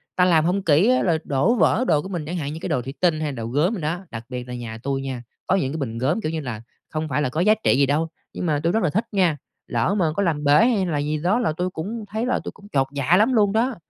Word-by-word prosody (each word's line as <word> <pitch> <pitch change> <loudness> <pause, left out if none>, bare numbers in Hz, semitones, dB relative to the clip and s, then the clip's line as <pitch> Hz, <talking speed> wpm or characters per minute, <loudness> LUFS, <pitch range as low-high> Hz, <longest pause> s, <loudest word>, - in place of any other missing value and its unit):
ta 180 - +4
làm 165 -3 +4
hông 185 +3 +1
kỹ 165 +7 +4
á, 255 - +3
rồi 165 -3 +2
đổ 145 - +2
vỡ 245 +2 +3
đồ 150 - +3
của - - -7
mình 175 -5 -4
chẳng 175 +4 -4
hạn 145 -2 -3
như 160 - -6
cái - - -4
đồ 125 - 0
thủy 135 +3 -7
tinh 170 -4 +2
hay 150 -2 -2
đồ 115 -4 -5
gốm 150 - +1
đồ 210 - -4
đó. 175 +5 -3
Đặc 115 0 -7
biệt 125 -1 -5
là 125 - -6
nhà 115 -2 -6
tui 135 0 -1
nha 130 -3 -5 0.2
có 190 - +3
những 135 -8 0
cái 160 - -3
bình 115 -6 -4
gốm, 145 - 0
kiểu 155 - -2
như 160 - -2
là, 120 -5 -5 0.3
không 155 0 -3
phải 145 +2 0
là 130 - 0
có 160 +6 -1
giá 210 +3 +5
trị - - +4
gì 140 - +4
đâu, 150 +4 +1 0.3
nhưng - - -4
mà 150 -3 +1
tui 170 +1 +1
rất 225 - +1
là 175 - +2
thích 215 +8 0
nha, 180 -7 +2 0.3
lỡ 200 - 0
mà 175 - +3
có 200 - +1
làm 155 -5 0
bể 145 - +3 0.2
hay 210 -6 +1
là 165 -4 -1
gì 150 +1 -1
đó 185 +10 +1
là 220 -9 +1
tui 180 +4 -2
cũng 205 +6 -5
thấy 220 +3 -2
là 250 - +1
tui - - -5
cũng 205 +1 -16
chột 135 -5 +1
dạ 145 +6 +3
lắm 225 +5 +3
luôn 205 -4 +3
đó. 240 +3 +1
160 Hz, 315 wpm, -23 LUFS, 140-195 Hz, 0.3 s, giá